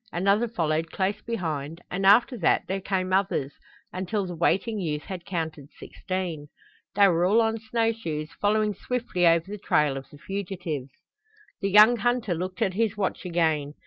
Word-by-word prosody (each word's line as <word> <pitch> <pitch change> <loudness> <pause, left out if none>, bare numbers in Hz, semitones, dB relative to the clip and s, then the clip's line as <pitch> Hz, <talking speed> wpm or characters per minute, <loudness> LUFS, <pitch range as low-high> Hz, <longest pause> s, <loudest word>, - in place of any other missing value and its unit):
Another 200 +6 +2
followed 165 -6 -1
close 195 +1 -1
behind, 165 -8 -4
and 195 +2 0
after 235 +5 +6
that 165 - +3
there 195 +1 -2
came 185 -1 -1
others, 190 -8 0 0.4
until 190 +2 -2
the 180 - -6
waiting 195 +6 +1
youth 150 -5 -3
had 180 -3 -7
counted 160 -5 -4
sixteen. 180 -6 -5 0.5
They 200 0 +6
were 170 -2 +2
all 200 +5 +4
on 225 0 +1
snow 225 +1 0
shoes, 155 -9 -5
following 210 0 +2
swiftly 225 -5 -1
over 165 0 +4
the 205 +1 -7
trail 150 -6 +1
of 135 - -9
the 145 - -14
fugitives. 175 -6 -5 0.7
The 195 - 0
young 215 +4 +7
hunter 240 -4 0
looked 185 +5 -3
at 190 -3 0
his 220 +1 0
watch 195 -1 -2
again. 160 -4 0
185 Hz, 170 wpm, -26 LUFS, 165-210 Hz, 0.7 s, young